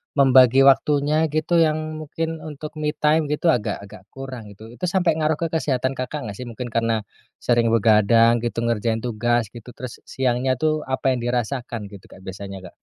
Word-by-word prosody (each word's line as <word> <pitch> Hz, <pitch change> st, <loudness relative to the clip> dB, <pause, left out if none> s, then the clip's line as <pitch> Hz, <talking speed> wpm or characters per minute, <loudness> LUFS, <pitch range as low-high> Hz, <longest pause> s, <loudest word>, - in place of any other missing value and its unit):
membagi 130 Hz, -1 st, +6 dB
waktunya 145 Hz, +4 st, +3 dB
gitu 155 Hz, +3 st, +1 dB
yang 155 Hz, -2 st, +3 dB, 0.2 s
mungkin 160 Hz, +1 st, -4 dB
untuk 155 Hz, -1 st, -8 dB
me 150 Hz, 0 st, -1 dB
time 155 Hz, 0 st, +2 dB
gitu 150 Hz, +3 st, +2 dB
agak-agak 100 Hz, -5 st, -4 dB
kurang 130 Hz, -2 st, -9 dB
itu. 100 Hz, +1 st, -13 dB
Itu 150 Hz, +10 st, -4 dB
sampai 175 Hz, -1 st, +2 dB
ngaruh 155 Hz, 0 st, +1 dB
ke 165 Hz, +2 st, -2 dB
kesehatan, 130 Hz, -5 st, 0 dB
Kakak, 135 Hz, +3 st, -5 dB
gak -, -, -9 dB
sih, 125 Hz, -, -6 dB
mungkin 120 Hz, +1 st, -7 dB
karena 115 Hz, -1 st, 0 dB, 0.4 s
sering 120 Hz, -1 st, +2 dB
begadang 115 Hz, +1 st, +4 dB
gitu, 115 Hz, 0 st, -3 dB
ngerjain 115 Hz, -1 st, -1 dB
tugas 120 Hz, -1 st, 0 dB
gitu, 120 Hz, +1 st, -12 dB
terus 130 Hz, -2 st, -8 dB
s -, -, -39 dB
siangnya 130 Hz, 0 st, 0 dB
tuh 155 Hz, +3 st, -1 dB
apa 130 Hz, 0 st, 0 dB
yang 125 Hz, -, -1 dB
dirasakan 120 Hz, -3 st, -3 dB
gitu, 100 Hz, -3 st, -13 dB
Kak, 95 Hz, -, -16 dB
biasanya, 95 Hz, 0 st, -8 dB
Kak? -, -, -38 dB
125 Hz, 180 wpm, -22 LUFS, 115-150 Hz, 0.4 s, membagi